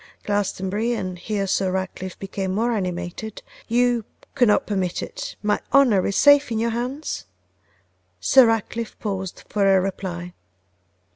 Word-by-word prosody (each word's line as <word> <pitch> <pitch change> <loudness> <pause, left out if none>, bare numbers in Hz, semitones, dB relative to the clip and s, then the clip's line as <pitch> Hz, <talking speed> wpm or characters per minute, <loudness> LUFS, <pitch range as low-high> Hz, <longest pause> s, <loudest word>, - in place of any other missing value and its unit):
Glastonbury,' 205 +2 -1
and 185 -5 -4
here 205 +1 -2
Sir 190 0 +1
Ratcliffe 185 0 -4
became 195 -1 -3
more 230 +3 +1
animated, 185 +1 -4 0.2
'you 240 0 +2 0.3
could 245 - +3
not 210 - +3
permit 190 -4 -1
it, - - -6
my 210 0 +1
honour 245 -9 +5
is 200 - -2
safe 285 -2 +6
in 225 - 0
your 230 +1 0
hands?' 245 - -4 0.9
Sir 255 - +6
Ratcliffe 225 0 -2
paused 190 -3 -4
for 195 -2 +3
a - - +4
reply. 180 -2 -4
205 Hz, 140 wpm, -23 LUFS, 190-235 Hz, 0.9 s, safe